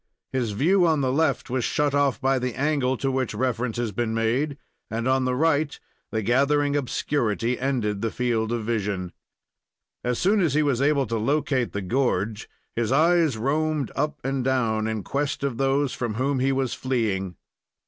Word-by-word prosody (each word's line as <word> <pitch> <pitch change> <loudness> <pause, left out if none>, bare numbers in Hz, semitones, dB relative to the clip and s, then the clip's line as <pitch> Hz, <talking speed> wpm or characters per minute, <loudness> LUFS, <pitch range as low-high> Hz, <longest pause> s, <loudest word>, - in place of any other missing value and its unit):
His 120 -5 -1
view 175 - +3
on 155 -3 +2
the 130 -1 +1
left 140 -1 +1
was 130 -1 0
shut 145 +3 +1
off 140 -3 +2
by 135 0 +2
the 125 -1 -3
angle 135 -3 +1
to 135 +2 -1
which 130 -2 -1
reference 125 -2 -1
has 120 -3 -1
been 115 +2 -2
made, 125 +6 0 0.3
and 115 +2 -2
on 130 0 +2
the 125 0 0
right 150 0 +1 0.3
the 110 -1 -2
gathering 140 +5 +2
obscurity 125 -4 -1
ended 120 -7 -1
the 115 - 0
field 115 -2 -1
of 115 -2 -2
vision. 100 -5 -2 0.9
As 125 -1 0
soon 205 +3 +3
as 155 -6 +1
he 155 - +4
was 135 -4 +1
able 140 -1 +3
to 115 -1 -2
locate 135 0 0
the 100 - -3
gorge, 110 -1 -1 0.3
his 115 0 0
eyes 160 -2 +3
roamed 150 +3 0
up 150 +1 -1
and 135 -1 -1
down 115 -4 +1
in 110 -2 -2
quest 140 0 -2
of 135 -4 -1
those 135 +1 +1
from 115 -4 -3
whom 135 +3 0
he 135 +2 +2
was 135 -2 0
fleeing. 105 -8 -1
130 Hz, 180 wpm, -25 LUFS, 115-145 Hz, 0.9 s, he